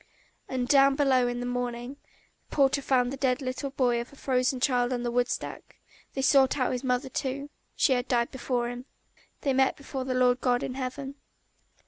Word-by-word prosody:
And 255 -1 -2
down 275 0 +5
below 265 -3 +3
in 245 0 -3
the - - -3
morning 245 +1 -3 0.5
the - - -9
porter 280 0 +3
found 255 -1 +1
the - - -5 0.2
little 265 +1 -3
dead 270 - -22
body 245 -3 +2
of 235 - -6
the - - -16
frozen 255 -1 0
child 245 -1 +1
on 245 -1 -2
the 240 - -1
woodstack; 245 +1 -3 0.4
they 270 - -1
sought 270 0 +4
out 255 - +1
his 250 +1 -3
mother 250 +1 0
too.... 275 +2 -4 0.2
She 270 - +3
had 245 0 -1
died 235 -2 +1
before 245 -2 -2
him. 245 +1 -7 0.6
They 275 -3 +1
met 265 0 +2
before 275 -1 -5
the 255 0 -2
Lord 250 0 +3
God 245 -1 +1
in 255 - -3
heaven. 270 +2 -5
255 Hz, 195 wpm, -28 LUFS, 245-270 Hz, 0.6 s, down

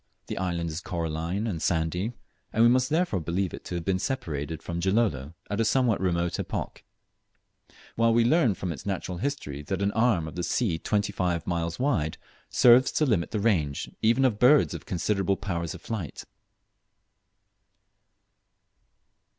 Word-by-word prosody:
The - - -5
island 85 -3 -2
is 80 +3 -5
coralline 85 +4 -3
and 90 -8 -3
sandy, 90 +7 0 0.4
and 110 - +3
we 120 - +7
must 130 +1 +3
therefore 160 - +1
believe 85 +3 -2
it - - -8
to 90 - -5
have 85 -1 -4
been 95 -1 +1
separated 80 - -3
from 85 0 -4
Gilolo 85 - 0
at 105 +2 -3
a - - +4
somewhat 120 -2 +2
remote 85 -2 0
epoch; - - -4 1.1
while 115 0 +3
we 115 0 +4
learn 125 - +3
from 90 -2 -4
its 85 - -7
natural 95 -2 -3
history 95 - -3
that 95 +7 -3
an 100 - +1
arm 110 -8 +2
of 80 - -8
the 90 - -2
sea 90 -2 0
twenty 105 +2 0
five 90 -3 -1
miles 85 -1 -2
wide 105 - 0 0.3
serves 125 +1 +6
to 155 - +2
limit 105 - +1
the 110 - -2
range 85 -10 0
even 120 +5 +3
of 110 -5 +1
birds 140 +4 +5
of - - -8
considerable 95 +1 0
powers 85 -5 -3
of - - -12
flight. 100 - -5
95 Hz, 165 wpm, -27 LUFS, 85-115 Hz, 1.1 s, we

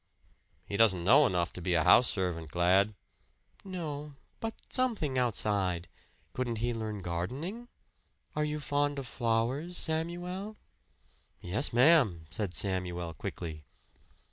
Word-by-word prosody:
"He 100 - -3
doesn't 100 -6 +4
know 135 +9 +6
enough 90 -3 0
to 90 - -7
be 90 +1 +1
a 80 - +3
house 120 +9 +6
servant, 90 -5 -2
Glad 95 +5 +3 0.4
" - - -32
"No 150 -6 -5 0.2
but 225 0 -4 0.2
something 215 - +1
outside. 100 -7 0 0.5
Couldn't 125 -2 -2
he 120 +2 0
learn 110 -3 -4
gardening? 135 - -4 0.7
Are 150 - +1
you 150 0 -2
fond 145 0 0
of 135 - -4
flowers, 120 +9 -1
Samuel?" 175 +6 -2 0.8
"Yes, 100 +11 -1
ma'am," 120 - +5
said 100 -5 -3
Samuel 90 -3 -2
quickly. 80 +1 -6
115 Hz, 125 wpm, -31 LUFS, 90-150 Hz, 0.8 s, know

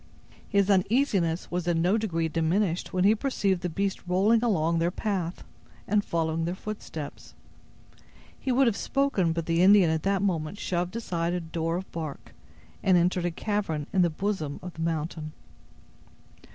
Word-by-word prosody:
His 200 -2 +3
uneasiness 195 -4 +1
was 175 0 -2
in 170 -1 +2
no 180 +5 +3
degree 170 -7 0
diminished 165 +3 0
when 180 -1 +1
he 205 +3 +6
perceived 205 -7 0
the 180 - -2
beast 195 +3 -2
rolling 205 +6 +3
along 170 -7 +2
their 170 +1 +2
path, 185 -3 -3 0.4
and 205 0 +2
following 165 -2 -1
their 175 +2 -2
footsteps. 190 -8 -7 1.0
He 265 - -1
would 265 +2 +4
have 230 -4 +2
spoken, 275 -10 +1
but 165 0 -2
the 165 +1 +1
Indian 190 -3 +6
at 160 -1 0
that 195 +1 +1
moment 170 -1 -1
shoved 180 +2 -2
aside 175 -7 -2
a 180 - 0
door 165 0 -2
of 190 - -7
bark, 155 -4 -6 0.5
and 185 -2 +4
entered 175 0 +1
a - - +2
cavern 170 -4 -2
in 190 - +4
the 175 - +4
bosom 160 -4 -3
of 180 -1 -7
the 160 - -8
mountain. 160 -1 -3
180 Hz, 165 wpm, -27 LUFS, 165-200 Hz, 1.0 s, he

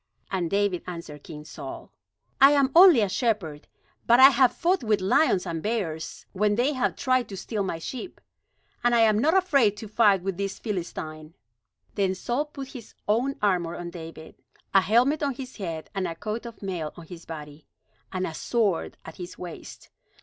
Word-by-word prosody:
And 180 -4 -1
David 200 -2 +1
answered 165 -5 -7
King 150 -1 -10
Saul: - - -9 0.5
"I 275 +2 +8
am 275 -2 +3
only 345 - +9
a 205 - +2
shepherd, 190 - -2 0.4
but 235 +1 +6
I 265 +1 +11
have 255 -1 +4
fought 350 +3 0
with 215 -2 +2
lions 190 - +2
and 165 -2 -3
bears, 180 -8 -3
when 205 +1 +2
they 255 +6 +1
have 255 -2 0
tried 255 -2 +1
to 195 - -7
steal 210 +2 -3
my 190 -4 -2
sheep. 255 - -7 0.6
And 240 0 +3
I 230 - +5
am 215 -2 +4
not 320 +9 +3
afraid 275 - +3
to 220 - -7
fight 205 -3 +3
with 190 -2 -3
this 200 0 -3
Philistine." 160 -6 -6 0.6
Then 190 -2 0
Saul 245 +9 -2
put 275 -3 -9
his 245 -6 -11
own 245 +6 +1
armor 175 -4 +1
on 175 0 -6
David 165 -2 -10 0.3
a 195 - +7
helmet 245 +10 +3
on 280 -3 -1
his 260 0 -8
head, 165 -6 -5
and 195 -2 -1
a 165 - -5
coat 215 +5 -5
of 230 -3 -12
mail 175 -6 -4
on 170 - -10
his 170 0 -11
body, 150 -2 -9 0.4
and 185 -1 -2
a 165 - -5
sword 205 -1 -1
at 160 - -10
his 175 0 -8
waist. 175 -2 -10
205 Hz, 185 wpm, -26 LUFS, 170-245 Hz, 0.6 s, I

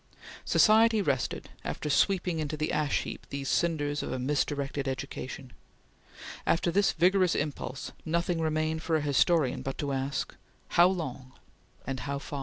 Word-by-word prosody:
Society 220 +1 +5
rested, 140 -10 -1
after - - -4
sweeping 175 +2 +2
into 155 0 -3
the 155 +1 -1
ash 150 -2 +1
heap - - -8
these 140 -1 -4
cinders 145 -3 0
of - - -4
a - - -2
misdirected 140 +1 -1
education. 130 -1 -5 0.9
After 170 +1 +1
this 200 +3 +3
vigorous 180 +1 +3
impulse, 145 -2 -3
nothing 170 +1 0
remained 155 0 0
for 165 0 0
a 155 - +2
historian 145 0 +2
but 135 - -4
to 145 -2 -2
ask 135 0 -2 0.3
how 175 +1 +6
long 135 -8 -4 0.5
and 135 -1 -3
how 140 +2 -3
far! 140 0 -6
150 Hz, 150 wpm, -29 LUFS, 140-170 Hz, 0.9 s, how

